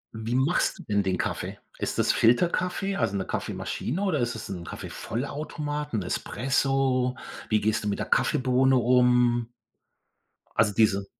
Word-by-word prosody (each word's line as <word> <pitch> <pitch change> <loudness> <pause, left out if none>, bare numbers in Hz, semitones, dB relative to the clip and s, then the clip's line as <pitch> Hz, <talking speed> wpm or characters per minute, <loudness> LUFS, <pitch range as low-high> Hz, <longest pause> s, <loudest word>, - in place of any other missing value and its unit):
Wie 110 +2 -3
machst 135 +6 +2
du - - -9
denn 100 -1 +1
den 95 -2 0
Kaffee? - - -3 0.2
Ist - - -2
das - - +3
Filterkaffee, 180 - +2
also 110 -4 0
'ne 95 - -2
Kaffeemaschine 155 +10 -3
oder 180 -7 +1
ist 120 -1 -1
das 110 - -7
'n 90 -3 -5
Kaffeevollautomat, 145 - -5
'n 100 - -1
Espresso? 130 +4 0 0.3
Wie 110 -1 +3
gehst 110 +1 0
du - - -2
mit 100 - 0
der - - -3
Kaffeebohne 130 +1 +3
um? 125 -1 +3 1.1
Also 105 -2 +3
diese 100 -2 +3
125 Hz, 150 wpm, -26 LUFS, 110-135 Hz, 1.1 s, das